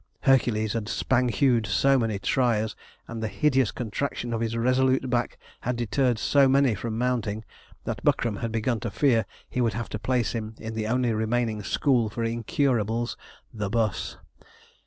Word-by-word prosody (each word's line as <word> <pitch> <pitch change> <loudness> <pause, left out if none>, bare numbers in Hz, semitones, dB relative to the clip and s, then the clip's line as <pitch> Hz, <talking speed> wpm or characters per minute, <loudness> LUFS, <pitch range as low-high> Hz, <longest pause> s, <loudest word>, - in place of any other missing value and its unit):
Hercules 115 -6 +2
had 110 -2 -3
'spang 130 -1 +1
hewed' 120 -3 +2
so 135 +7 +3
many 110 -3 0
triers, 110 0 +1 0.3
and 115 -1 -6
the 110 - -1
hideous 135 -1 +2
contraction 120 +1 -3
of 115 - -1
his 115 0 -1
resolute 130 +2 +2
back 120 -1 0 0.2
had 125 - -2
deterred 120 +1 +1
so 140 +4 +4
many 135 -2 +4
from 110 +2 -4
mounting, 115 -3 -1 0.4
that - - -4
Buckram 110 -4 +1
had 115 +2 -3
begun 115 +1 0
to 115 - -3
fear 115 +1 +2 0.2
he 125 - -2
would 115 -2 +1
have 115 -1 -4
to 105 - -4
place 125 0 0
him 110 -1 -5
in 110 0 -6
the 110 -1 -2
only 125 0 +1
remaining 110 0 0
school 120 +1 +1
for 115 +2 -4
incurables, 115 0 0 0.4
the 105 -3 -3
'bus. 110 -3 -1
115 Hz, 170 wpm, -26 LUFS, 110-125 Hz, 0.4 s, so